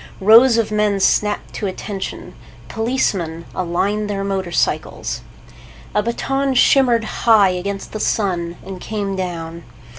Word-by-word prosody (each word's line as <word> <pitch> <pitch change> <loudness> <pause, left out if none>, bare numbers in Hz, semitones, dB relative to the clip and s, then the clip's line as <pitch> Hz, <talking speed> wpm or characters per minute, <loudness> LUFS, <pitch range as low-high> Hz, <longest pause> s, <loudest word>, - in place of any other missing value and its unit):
Rows 230 +4 +6
of 225 -2 0
men 210 -1 +1
snapped 210 +2 +1
to 205 - -3
attention. 195 +1 -6 0.4
Policemen 195 -9 -1
aligned 195 +4 -1
their 195 -1 -2
motorcycles. 190 -3 -2 0.7
A 210 - +2
baton 270 +4 -1
shimmered 245 -3 +4
high 215 -2 +3
against 195 +2 -4
the 215 - -5
sun 175 -6 -1
and 190 -1 -8
came 200 -2 -3
down. 170 -2 -5
200 Hz, 120 wpm, -19 LUFS, 185-220 Hz, 0.7 s, Rows